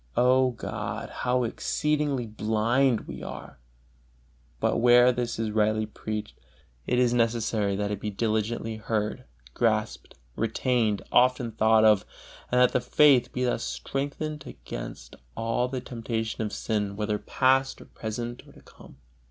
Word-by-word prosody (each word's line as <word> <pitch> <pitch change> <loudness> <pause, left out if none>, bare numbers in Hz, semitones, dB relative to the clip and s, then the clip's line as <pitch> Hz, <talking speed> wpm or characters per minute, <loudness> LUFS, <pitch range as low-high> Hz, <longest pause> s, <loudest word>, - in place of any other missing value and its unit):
O 130 +1 +4
God, 115 - -5
how 125 0 0
exceeding 145 0 -1
blind 110 +4 +1
we - - -9
are! - - -9 1.0
But - - +1
where 120 +1 +6
this 120 -1 -3
is 110 -1 -2
rightly 110 0 +1
preached, 110 0 -6 0.5
it 125 - +1
is 125 -1 +3
necessary 115 -4 +1
that 105 +1 -2
it 105 - -3
be 105 - -3
diligently 110 +1 -2
heard, 105 -1 -2 0.3
grasped, - - -1 0.2
retained, 115 -2 0
often 125 -1 +3
thought 110 0 +4
of, 105 -2 +5 0.5
and 125 - +3
that 125 0 +5
the 125 - +1
faith 130 0 +4
be 125 - -2
thus 120 -2 0
strengthened 145 +1 -4
against - - -8 0.2
all 115 +2 0
the 130 0 -4
temptation 115 -2 -4
of 105 -1 -2
sin, 105 -3 -2
whether 105 0 -1
past, 135 0 +1
or - - -12
present, 120 +2 -5
or - - -16
to - - -17
come. - - -16
115 Hz, 145 wpm, -27 LUFS, 110-125 Hz, 1.0 s, where